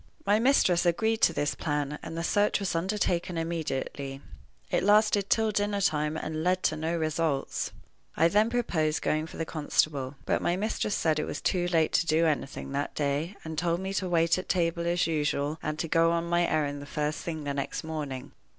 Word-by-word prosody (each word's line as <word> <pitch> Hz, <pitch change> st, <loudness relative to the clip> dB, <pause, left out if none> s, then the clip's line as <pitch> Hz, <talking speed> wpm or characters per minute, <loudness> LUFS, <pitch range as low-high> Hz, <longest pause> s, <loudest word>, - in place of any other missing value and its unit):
My 205 Hz, +2 st, +4 dB
mistress 225 Hz, -9 st, +4 dB
agreed 220 Hz, +6 st, +1 dB
to -, -, +5 dB
this 145 Hz, -3 st, -1 dB
plan, 145 Hz, -1 st, -2 dB
and 165 Hz, 0 st, -7 dB
the 165 Hz, -, -2 dB
search 205 Hz, +3 st, +2 dB
was 195 Hz, -3 st, -2 dB
undertaken 175 Hz, -1 st, -1 dB
immediately. 145 Hz, -4 st, -3 dB, 0.5 s
It -, -, +2 dB
lasted 205 Hz, 0 st, +4 dB
till 220 Hz, -1 st, +3 dB
dinner 205 Hz, 0 st, 0 dB
time, 150 Hz, -4 st, +1 dB
and 155 Hz, 0 st, -3 dB
led 185 Hz, +1 st, +1 dB
to 155 Hz, -, +2 dB
no 160 Hz, +2 st, -1 dB
results. 155 Hz, -3 st, -1 dB, 0.5 s
I 165 Hz, -, +5 dB
then 210 Hz, +5 st, +3 dB
proposed 165 Hz, -11 st, 0 dB
going 155 Hz, +1 st, 0 dB
for -, -, -11 dB
the 165 Hz, -, -2 dB
constable. 145 Hz, -3 st, 0 dB
But -, -, +1 dB
my 175 Hz, -, +1 dB
mistress 210 Hz, +1 st, -1 dB
said 155 Hz, -2 st, +1 dB
it 150 Hz, -, -1 dB
was -, -, -4 dB
too 175 Hz, -1 st, 0 dB
late 165 Hz, -3 st, +2 dB
to 170 Hz, -, +2 dB
do 160 Hz, +1 st, +3 dB
anything 145 Hz, -3 st, -2 dB
that 140 Hz, +1 st, -2 dB
day, 150 Hz, +6 st, -1 dB
and 160 Hz, -1 st, -4 dB
told 170 Hz, -1 st, 0 dB
me 190 Hz, +1 st, -4 dB
to 190 Hz, -2 st, -1 dB
wait 170 Hz, 0 st, +3 dB
at 185 Hz, -, -8 dB
table 170 Hz, -1 st, +1 dB
as 175 Hz, +1 st, +2 dB
usual, 150 Hz, -1 st, -1 dB
and 155 Hz, 0 st, -3 dB
to 165 Hz, -, -2 dB
go 165 Hz, +1 st, +3 dB
on 170 Hz, 0 st, 0 dB
my 175 Hz, 0 st, +2 dB
errand 145 Hz, -2 st, -1 dB
the 145 Hz, -, -9 dB
first 150 Hz, +1 st, -2 dB
thing 160 Hz, -3 st, -5 dB
the 145 Hz, -1 st, -2 dB
next 140 Hz, -1 st, -3 dB
morning. 150 Hz, -5 st, -5 dB
165 Hz, 205 wpm, -28 LUFS, 150-180 Hz, 0.5 s, to